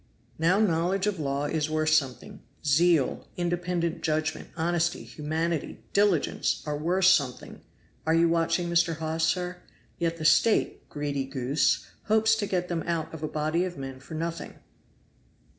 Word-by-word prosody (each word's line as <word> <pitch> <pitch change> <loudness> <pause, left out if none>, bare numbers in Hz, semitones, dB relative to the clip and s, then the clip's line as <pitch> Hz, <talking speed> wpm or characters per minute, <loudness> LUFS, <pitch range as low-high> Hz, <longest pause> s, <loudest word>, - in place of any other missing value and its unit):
Now 170 +4 +3
knowledge 185 0 +1
of 205 -4 -1
law 140 -1 -1
is 155 0 -1
worth 155 0 +1
something; 135 -6 0 0.2
zeal, 155 0 +3
independent 175 -1 -1
judgment, 155 0 -1
honesty, 170 +1 0
humanity, 160 +1 -3
diligence 200 -10 +1
are 150 -1 -2
worth 175 +5 +1
something 145 -9 +2 0.5
(are 160 - +4
you 165 +1 +4
watching 165 +1 +1
Mr. 170 -1 +2
Hawes, 160 0 -1
sir?); 180 +1 -1 0.4
yet 170 -1 0
the 155 - -5
State, 215 +7 +3
greedy 145 -2 -2
goose, 135 +2 0 0.2
hopes 220 +1 +4
to 205 -2 -2
get 180 -2 -1
them 170 -2 -2
out 165 -2 -2
of 160 - -7
a 155 - -1
body 155 +3 0
of 180 -1 -4
men 135 -1 -7
for 150 +4 -9
nothing!" 165 +1 -4
165 Hz, 150 wpm, -27 LUFS, 155-175 Hz, 0.5 s, are